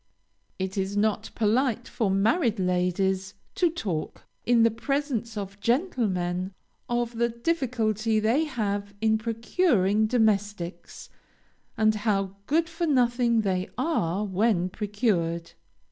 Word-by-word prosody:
It 190 +1 -3
is 195 +1 -2
not 215 +1 +1
polite 235 +2 +1
for 220 -5 -1
married 220 - +2
ladies 185 +1 0 0.2
to 350 - +2
talk, 190 - -4 0.2
in 235 -1 +5
the 230 - +4
presence 235 -2 -2
of 200 0 -6
gentlemen, 195 - 0 0.3
of 240 -1 -1
the 235 0 +3
difficulty 230 -5 0
they 235 +9 +2
have 205 -7 -3
in 220 0 +2
procuring 220 - +1
domestics, 205 -6 -1 0.7
and 215 0 +4
how 200 -3 -1
good 325 +3 +2
for 335 0 -2
nothing 240 -4 +3
they 185 -2 -1
are 210 - 0
when 190 -2 +1
procured. 185 -5 -1
215 Hz, 115 wpm, -26 LUFS, 195-240 Hz, 0.7 s, in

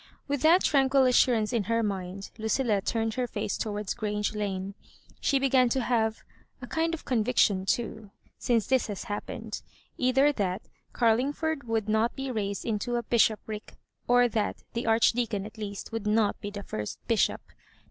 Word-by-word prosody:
With 285 -2 -1
that 335 +5 +5
tranquil 270 -1 +4
assurance 245 -3 +3
in 225 -4 +1
her 230 +1 +1
mind, 195 -1 -4
Lucilhi 220 -1 +1
turned 225 +2 -1
her 250 +1 -1
face - - -3
towards 210 -2 -3
Grange 210 -2 -2
Lana 200 -2 -3 0.5
She 280 - +2
began 265 -2 +3
to 260 +2 +1
have 225 -2 0 0.4
a 250 - -7
kind 325 +6 0
of 315 - -13
con 240 -4 +1
viction, 205 -5 +2
too, 220 -1 -2 0.3
since 230 -3 +1
this 260 -2 +2
had 205 -2 -4
happened, 205 +2 -5 0.4
either 265 +3 +4
that 195 -6 -2 0.3
Carlingford 275 +6 +1
would 225 -2 -1
not 220 +2 +1
be 270 -1 -4
raised 200 -4 -3
into 230 +2 -1
a 240 - -1
bishopric, 220 -2 0 0.3
or 245 0 +5
that 220 -3 -2
the 235 0 -3
Archdeacon 225 -2 +2
at 220 +1 -11
least 200 0 -6
would 225 -2 -3
not 210 -1 +2
be 205 - -4
the 205 0 -7
first 105 - -5
bishop. - - +2
225 Hz, 170 wpm, -28 LUFS, 210-250 Hz, 0.5 s, that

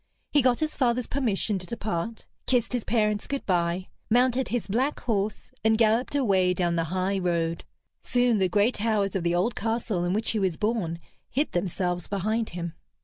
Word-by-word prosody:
He 290 - +5
got 250 0 +2
his 310 -1 -1
father's 245 -2 +1
permission 215 -6 0
to 180 - -10
depart, 220 0 -3 0.2
kissed 250 -1 +1
his 245 -3 0
parents 210 -2 +1
good 280 -1 -3
bye, 175 0 0 0.2
mounted 250 +2 +3
his 235 -6 -2
black 255 +9 0
horse, 210 -3 -2
and 220 0 +4
galloped 230 +4 +2
away 190 -9 +3
down 175 -2 +1
the 165 -1 +1
high 185 +3 -1
road. 170 -2 0 0.4
Soon 245 -3 +2
the 190 -1 +2
gray 205 +5 +3
towers 210 -4 0
of 190 - +1
the 170 0 +1
old 195 +7 +1
castle 225 -4 -1
in 175 +1 0
which 220 +2 0
he 220 - 0
was 185 -5 0
born 210 -7 -1 0.3
hid 290 +4 0
themselves 180 -1 -1
behind 215 +3 -1
him. 170 -1 -5
210 Hz, 185 wpm, -27 LUFS, 180-235 Hz, 0.4 s, He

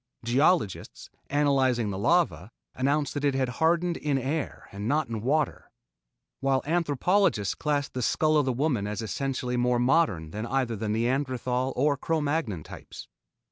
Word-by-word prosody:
Geologists, 135 - +1 0.2
analyzing 135 -6 +2
the 95 - -4
lava, 100 - +1 0.2
announced 140 +3 0
that 145 - -4
it 140 -2 +2
had 130 -2 0
hardened 170 +1 +2
in 145 -2 0
air 140 +4 -3
and 100 +2 -5
not 150 +5 +1
in 115 -2 -4
water, 145 +4 -1 0.7
while 135 -1 +1
anthropologists 165 - +1
classed 145 -2 -2
the 125 - -3
skull 155 +5 +2
of 150 -2 +3
the 130 - +1
woman 125 -5 0
as 105 +2 -4
essentially 125 +1 -2
more 125 0 +2
modern 120 - +2
than 110 +5 -4
either 125 -2 0
the 110 0 -4
Neanderthal 125 +2 0
or 140 +2 +2
Cro 160 +4 -1
Magnon 145 - -1
types. - - -10
135 Hz, 155 wpm, -27 LUFS, 115-150 Hz, 0.7 s, of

